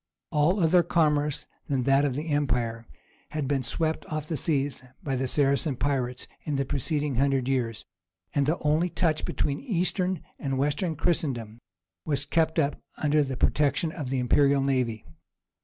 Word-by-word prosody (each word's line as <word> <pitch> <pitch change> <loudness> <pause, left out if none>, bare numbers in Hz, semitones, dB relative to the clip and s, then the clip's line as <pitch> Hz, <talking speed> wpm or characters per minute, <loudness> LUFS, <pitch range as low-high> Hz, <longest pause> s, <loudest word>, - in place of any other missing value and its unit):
All 160 +6 +3
other 175 +1 +5
commerce 150 -4 +1 0.2
than 135 -3 +1
that 135 +2 +4
of 135 -3 -1
the 155 +3 -4
empire 120 -6 0 0.4
had 150 -3 -2
been 140 -1 +1
swept 160 +6 -1
off 155 -1 -3
the 160 - -2
seas 140 -2 0 0.2
by 135 -2 -1
the 130 +1 -1
Saracen 140 +1 +2
pirates 125 -1 -1 0.2
in 150 - -2
the 135 0 0
preceding 145 0 -1
hundred 135 -1 +2
years, 120 -5 -1 0.5
and 140 -1 +2
the 160 - +2
only 155 +4 +2
touch 160 -3 0
between 140 -1 -1
Eastern 185 - 0 0.2
and 135 -2 -2
Western 150 +5 0
Christendom 135 - -1 0.4
was 140 -2 -1
kept 160 +1 +1
up 145 -2 +1 0.2
under 150 0 +2
the 135 -3 -2
protection 150 +4 +2
of 150 -6 -5
the 135 - 0
imperial 140 +2 +3
navy. 125 -5 0
145 Hz, 160 wpm, -27 LUFS, 135-155 Hz, 0.5 s, other